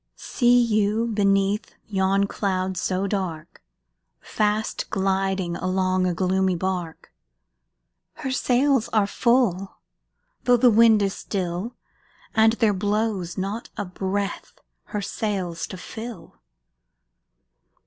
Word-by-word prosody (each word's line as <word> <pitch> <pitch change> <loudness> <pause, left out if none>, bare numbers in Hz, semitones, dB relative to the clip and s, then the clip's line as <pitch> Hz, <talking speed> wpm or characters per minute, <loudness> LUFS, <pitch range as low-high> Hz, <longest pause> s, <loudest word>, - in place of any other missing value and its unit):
See 245 -1 +2
you, 215 -1 +2
beneath 200 -1 +1
yon 195 -1 +1
cloud 190 -2 -2
so 185 +2 -1
dark, 185 -6 -4 0.6
Fast 215 +1 -1
gliding 190 -2 0
along 185 0 0
a 180 - 0
gloomy 190 +1 +1
bark? 180 -2 -4 1.0
Her 265 - -5
sails 260 -1 +2
are 215 -2 +4
full, 205 -4 +1 0.7
though 245 0 +5
the 245 0 +5
wind 220 -1 +5
is 195 -1 0
still, 185 +4 -4 0.6
And 220 0 +5
there 225 -3 +2
blows 205 -3 -1
not 200 +5 -4
a 205 - -2
breath 195 +2 -4 0.3
her 210 -2 -4
sails 190 -6 -3
to 185 - -8
fill! 220 +1 -9
200 Hz, 105 wpm, -24 LUFS, 185-220 Hz, 1.0 s, though